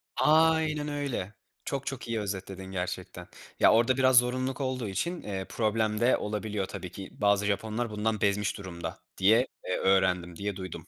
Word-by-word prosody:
Aynen 155 Hz, -1 st, +3 dB
öyle. 140 Hz, -9 st, -3 dB, 0.3 s
Çok 140 Hz, -1 st, -3 dB
çok 135 Hz, -4 st, -5 dB
iyi 115 Hz, -1 st, -1 dB
özetledin 95 Hz, -1 st, -5 dB
gerçekten. 90 Hz, -1 st, -5 dB, 0.3 s
Ya, -, -, +6 dB
orada 120 Hz, +3 st, +3 dB
biraz 130 Hz, -1 st, +5 dB
zorunluluk 130 Hz, +2 st, +2 dB
olduğu 130 Hz, -4 st, -2 dB
için, 170 Hz, -, -2 dB
eee, 95 Hz, -2 st, -4 dB
problem 110 Hz, -1 st, 0 dB
de 120 Hz, +2 st, +4 dB
olabiliyor, 105 Hz, -1 st, -3 dB
tabii 90 Hz, -1 st, -7 dB
ki. 95 Hz, +1 st, -8 dB
Bazı 100 Hz, 0 st, +3 dB
Japonlar 110 Hz, +3 st, -1 dB
bundan 110 Hz, 0 st, -1 dB
bezmiş 100 Hz, 0 st, +1 dB
durumda 90 Hz, -3 st, -6 dB, 0.2 s
diye, 110 Hz, +7 st, +4 dB, 0.2 s
eee, 90 Hz, -, -1 dB
öğrendim 90 Hz, -3 st, +2 dB
diye 100 Hz, +2 st, -3 dB
duydum. 95 Hz, -2 st, -7 dB
105 Hz, 160 wpm, -29 LUFS, 95-130 Hz, 0.3 s, Ya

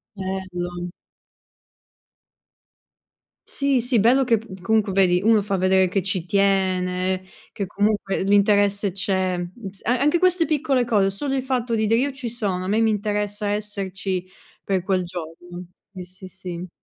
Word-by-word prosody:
Bello. 180 Hz, -2 st, -4 dB, 2.6 s
Sì, 275 Hz, -3 st, +1 dB
sì, 245 Hz, -1 st, +2 dB
bello 250 Hz, +6 st, +4 dB
che 230 Hz, -2 st, +3 dB
p 195 Hz, -4 st, -11 dB
comunque 220 Hz, 0 st, +1 dB
vedi, 185 Hz, -2 st, +3 dB
uno 220 Hz, -1 st, +4 dB
fa 195 Hz, -1 st, -1 dB
vedere 185 Hz, 0 st, +3 dB
che 190 Hz, 0 st, -1 dB
ci 185 Hz, -3 st, -1 dB
tiene, 185 Hz, -1 st, +1 dB, 0.3 s
che 200 Hz, -, -3 dB
comunque 205 Hz, 0 st, 0 dB
l'interesse 200 Hz, 0 st, +3 dB
c'è, 185 Hz, -1 st, 0 dB
m 175 Hz, 0 st, -4 dB, 0.2 s
s 195 Hz, -, -16 dB
a 245 Hz, +2 st, +2 dB
anche 295 Hz, +5 st, +3 dB
queste 365 Hz, -2 st, +3 dB
piccole 285 Hz, -5 st, +1 dB
cose, 205 Hz, -4 st, +2 dB
solo 270 Hz, +8 st, -3 dB
il 265 Hz, -, 0 dB
fatto 250 Hz, -3 st, -1 dB
di 220 Hz, -1 st, +1 dB
dire: 225 Hz, +2 st, +3 dB
"Io 280 Hz, +3 st, 0 dB
ci 265 Hz, -3 st, -5 dB
sono, 195 Hz, -6 st, -2 dB
a -, -, -4 dB
me 215 Hz, +3 st, +1 dB
mi 225 Hz, -1 st, +3 dB
interessa 205 Hz, 0 st, -2 dB
esserci 195 Hz, -3 st, -2 dB, 0.4 s
per 190 Hz, -2 st, -1 dB
quel 185 Hz, -1 st, 0 dB
giorno". 175 Hz, +1 st, -8 dB, 0.3 s
Sì, 185 Hz, -2 st, -8 dB
sì, 185 Hz, +1 st, -12 dB
sì. 180 Hz, -1 st, -7 dB
200 Hz, 155 wpm, -23 LUFS, 185-225 Hz, 2.6 s, bello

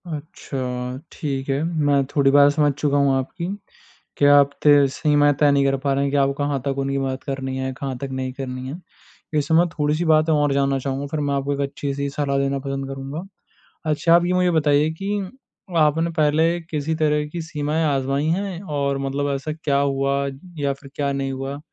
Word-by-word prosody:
अच्छा, 130 Hz, -5 st, -5 dB
ठीक 135 Hz, -2 st, -4 dB
है, 135 Hz, +1 st, +1 dB
मैं 145 Hz, -4 st, +2 dB
थोड़ी 140 Hz, -2 st, +4 dB
बात 145 Hz, 0 st, +6 dB
समझ 145 Hz, 0 st, +2 dB
चुका 145 Hz, 0 st, 0 dB
हूँ 140 Hz, -1 st, +3 dB
आपकी। 170 Hz, +6 st, -4 dB, 0.7 s
क्या 145 Hz, 0 st, +6 dB
आप 140 Hz, 0 st, +3 dB
तय 145 Hz, -2 st, +6 dB
सीमाएँ 145 Hz, 0 st, +3 dB
तय 145 Hz, -1 st, +5 dB
नहीं 140 Hz, -1 st, +3 dB
कर 135 Hz, 0 st, +2 dB
पा 140 Hz, 0 st, 0 dB
रहे 140 Hz, +1 st, +1 dB
हैं 140 Hz, -, 0 dB
कि 145 Hz, -, +1 dB
आप 140 Hz, 0 st, +3 dB
कहाँ 145 Hz, -1 st, -1 dB
तक 140 Hz, -1 st, -1 dB
उनकी 135 Hz, 0 st, -1 dB
बात 135 Hz, -1 st, -3 dB
करनी 135 Hz, -1 st, -4 dB
है, 130 Hz, 0 st, -2 dB
कहाँ 135 Hz, 0 st, -5 dB
तक 135 Hz, +2 st, -5 dB
नहीं 130 Hz, -1 st, -3 dB
करनी 130 Hz, -1 st, -5 dB
है। -, -, -5 dB, 0.6 s
वैसे 150 Hz, +1 st, +1 dB
मैं 170 Hz, +2 st, +5 dB
थोड़ी-सी 155 Hz, +1 st, -1 dB
बातें 155 Hz, 0 st, +4 dB
और 145 Hz, -2 st, +2 dB
जानना 140 Hz, -1 st, +1 dB
चाहूँगा 135 Hz, +1 st, -3 dB
फिर 155 Hz, -, -1 dB
मैं 145 Hz, -1 st, 0 dB
आपको 140 Hz, +1 st, -1 dB
एक 140 Hz, -, -4 dB
अच्छी-सी 140 Hz, 0 st, -3 dB
सलाह 140 Hz, -1 st, -1 dB
देना 140 Hz, 0 st, 0 dB
पसंद 135 Hz, 0 st, -4 dB
करूँगा। 135 Hz, +4 st, -6 dB, 0.7 s
अच्छा 165 Hz, +3 st, +4 dB
आप 175 Hz, 0 st, +4 dB
ये 180 Hz, -, +1 dB
मुझे 180 Hz, -1 st, +3 dB
बताइए 150 Hz, -2 st, +3 dB
कि 205 Hz, +1 st, -1 dB, 0.6 s
आपने 160 Hz, +2 st, +3 dB
पहले 160 Hz, +3 st, +3 dB
किसी 160 Hz, -1 st, -3 dB
तरह 150 Hz, -1 st, +1 dB
की 170 Hz, +2 st, -5 dB
सीमाएँ 155 Hz, 0 st, -1 dB
आज़माई 140 Hz, +1 st, 0 dB
हैं? 185 Hz, +1 st, -1 dB
और 140 Hz, -5 st, -1 dB
मतलब 140 Hz, +1 st, -1 dB
ऐसा 145 Hz, +3 st, -4 dB
क्या 150 Hz, -3 st, -1 dB
हुआ 140 Hz, 0 st, +1 dB, 0.4 s
या 140 Hz, -1 st, 0 dB
फिर 135 Hz, 0 st, -14 dB
क्या 140 Hz, -1 st, -1 dB
नहीं 135 Hz, 0 st, -2 dB
हुआ? 135 Hz, +2 st, -5 dB
140 Hz, 200 wpm, -22 LUFS, 135-150 Hz, 0.7 s, बात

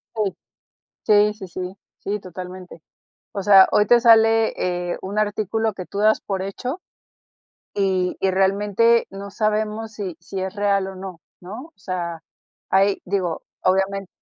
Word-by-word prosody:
Sí. 210 Hz, -3 st, -1 dB, 0.7 s
Sí, 210 Hz, -1 st, +5 dB
sí, 200 Hz, -3 st, -9 dB
sí. 180 Hz, +1 st, -6 dB, 0.3 s
Sí, 205 Hz, +1 st, -3 dB
totalmente. 180 Hz, -1 st, -9 dB, 0.5 s
O 200 Hz, -, -3 dB
sea, 195 Hz, -1 st, +8 dB
hoy 210 Hz, -, +4 dB
te 240 Hz, +2 st, +6 dB
sale, 225 Hz, -1 st, +5 dB, 0.4 s
eh, -, -, -3 dB
un 195 Hz, +2 st, -5 dB
artículo 215 Hz, +1 st, 0 dB
que 185 Hz, -1 st, -7 dB
tú 200 Hz, -, -6 dB
das 215 Hz, +1 st, +3 dB
por 195 Hz, -2 st, -3 dB
hecho, 250 Hz, -, -5 dB, 1.0 s
y 190 Hz, -2 st, +1 dB
y 190 Hz, -, +2 dB
realmente 205 Hz, +5 st, +3 dB
no 200 Hz, +1 st, -8 dB
sabemos 215 Hz, +1 st, -1 dB
si 195 Hz, -5 st, -5 dB
si 195 Hz, -, -6 dB
es 190 Hz, 0 st, -3 dB
real 200 Hz, -1 st, +1 dB
o 190 Hz, -, -8 dB
no, 185 Hz, -2 st, -8 dB, 0.2 s
¿no? 210 Hz, +9 st, -8 dB
O 330 Hz, -, -19 dB
sea, 175 Hz, -3 st, -5 dB, 0.5 s
hay, 195 Hz, +1 st, +3 dB
digo, 180 Hz, -3 st, -2 dB, 0.2 s
obviamen 195 Hz, +1 st, +1 dB
195 Hz, 150 wpm, -22 LUFS, 185-215 Hz, 1.0 s, sea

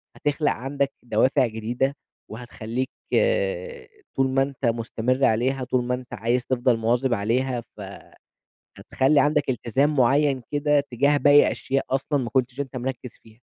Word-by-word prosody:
هتخلَق 145 Hz, +1 st, 0 dB
عَندك 140 Hz, +2 st, -2 dB
دوافع 125 Hz, +3 st, +2 dB
جديدة 120 Hz, +5 st, -2 dB, 0.3 s
وهتخلّيك 120 Hz, +2 st, -5 dB, 0.2 s
آآ -, -, 0 dB, 0.3 s
طول 135 Hz, 0 st, +2 dB
ما 135 Hz, +1 st, +1 dB
أنت 135 Hz, -1 st, -3 dB
مستمِر 120 Hz, +3 st, 0 dB
عليها، 130 Hz, +4 st, +1 dB
طول 125 Hz, 0 st, 0 dB
ما 125 Hz, +1 st, -2 dB
أنت 125 Hz, -1 st, -10 dB
عايز 120 Hz, +3 st, -1 dB
تفضَل 125 Hz, -2 st, +1 dB
مواظِب 120 Hz, +3 st, +1 dB
عليها، 120 Hz, +4 st, -1 dB, 0.2 s
ف -, -, -9 dB, 1.0 s
هتخلّي 140 Hz, +3 st, +2 dB
عَندك 145 Hz, -2 st, +1 dB
إلتزام 135 Hz, +5 st, 0 dB
معيّن 135 Hz, +1 st, +2 dB
كده 145 Hz, 0 st, +2 dB
تجاه 140 Hz, +2 st, +1 dB
باقي 145 Hz, 0 st, +5 dB
أشياء 135 Hz, +1 st, -2 dB
أصلًا 135 Hz, +2 st, 0 dB
ما 120 Hz, -3 st, -3 dB
كنتش 130 Hz, 0 st, -1 dB
أنت 135 Hz, -2 st, -5 dB
مركّز 125 Hz, -1 st, -5 dB
فيها. 110 Hz, -1 st, -18 dB
130 Hz, 145 wpm, -24 LUFS, 120-140 Hz, 1.0 s, باقي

